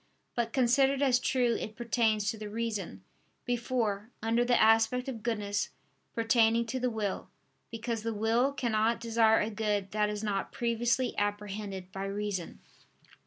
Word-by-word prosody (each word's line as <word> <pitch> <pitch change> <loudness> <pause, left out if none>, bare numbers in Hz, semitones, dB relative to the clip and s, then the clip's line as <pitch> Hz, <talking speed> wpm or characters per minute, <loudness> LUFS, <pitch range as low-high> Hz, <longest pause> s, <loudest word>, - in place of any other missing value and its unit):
But 235 -1 -1
considered 270 +2 +3
as 255 -3 +4
true 245 -2 +1
it 215 - -6
pertains 225 -3 +1
to 225 - -8
the 210 -1 -6
reason, 210 - -4 0.4
before, 235 -4 -1
under 230 +2 +1
the 245 0 +3
aspect 225 +4 +4
of 240 -5 -5
goodness, 205 -3 -1 0.5
pertaining 230 0 +3
to 260 - -1
the 250 0 +1
will: 215 -4 -3 0.4
because 230 0 -3
the 230 +1 -2
will 225 +5 +2
cannot 230 -4 +1
desire 225 -1 +3
a 215 - -1
good 210 -2 -1
that 210 0 +1
is 210 0 -4
not 200 -2 -2
previously 240 +2 0
apprehended 205 -2 -3
by 195 +1 -4
reason. 195 -3 -4
225 Hz, 150 wpm, -30 LUFS, 210-240 Hz, 0.5 s, as